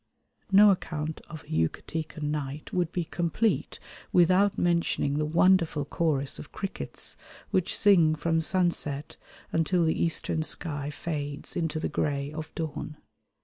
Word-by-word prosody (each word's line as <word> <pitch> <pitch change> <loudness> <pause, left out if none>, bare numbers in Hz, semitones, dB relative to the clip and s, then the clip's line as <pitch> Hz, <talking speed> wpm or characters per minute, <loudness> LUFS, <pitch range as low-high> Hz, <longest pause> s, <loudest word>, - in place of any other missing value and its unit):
No 205 +1 +8
account 155 -4 -3
of 155 -3 -8
a - - -23
Yucatecan 155 - -2
night 150 -1 -4
would 175 -2 0
be 175 - -1
complete 175 +7 -1 0.3
without 185 +3 +4
mentioning 170 -4 +1
the 150 - 0
wonderful 165 -2 +3
chorus 145 -3 0
of - - -10
crickets 195 -1 -6 0.4
which 185 -2 +2
sing 170 -6 +5
from 165 +1 0
sunset 160 -5 0 0.3
until 165 +1 +2
the 160 - +2
eastern 165 -1 0
sky 145 -2 -2
fades 145 -1 -5
into 160 -2 -1
the - - -1
grey 145 -1 -1
of 155 +1 -6
dawn. 155 -1 -5
160 Hz, 135 wpm, -28 LUFS, 150-175 Hz, 0.4 s, No